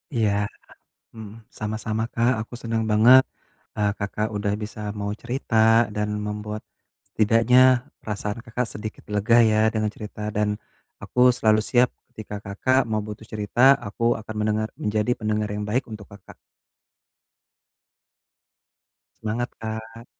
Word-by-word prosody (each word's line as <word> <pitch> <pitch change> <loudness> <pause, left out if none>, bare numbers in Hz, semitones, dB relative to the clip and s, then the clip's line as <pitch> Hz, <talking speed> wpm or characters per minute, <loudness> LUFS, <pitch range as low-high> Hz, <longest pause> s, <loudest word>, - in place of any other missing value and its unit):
Iya, 110 -3 +2 0.8
mmm, 110 0 -11
sama-sama 110 +1 -3
Kak 120 +2 +2
aku 115 - -11
seneng 115 -1 -1
banget, 120 +5 +7 0.5
eee, 105 -1 +1
Kakak 105 +1 -2
udah 100 0 -1
bisa 105 +1 -7 0.2
mau 100 0 -2
cerita 125 -2 -4 0.4
dan 105 0 -1 0.2
membuat 105 0 -5 0.5
setidaknya 125 +3 +4
perasaan 105 0 -4
Kakak 120 +1 -2
sedikit 110 +1 -7
lega 105 +3 +3
ya 110 - +2 0.2
dengan 110 -1 0
cerita, 105 0 -6
dan 105 0 0 0.4
aku 125 0 +4
selalu 110 -3 +3
siap 125 -1 +3 0.2
ketika 105 -1 -7
Kakak 130 +7 +1
mau 110 -2 -1
butuh 105 +1 -8
cerita 110 +6 +4
aku 115 +3 0
akan 110 0 -8
mendengar, 110 0 0
menjadi 105 +2 0
pendengar 105 -1 -1
yang 105 0 -3
baik 115 +4 -1
untuk 105 -2 -8
Kakak. 100 -2 -14 2.9
Semangat 115 +3 -2
Kak. 110 +1 -7
110 Hz, 130 wpm, -24 LUFS, 105-115 Hz, 2.9 s, banget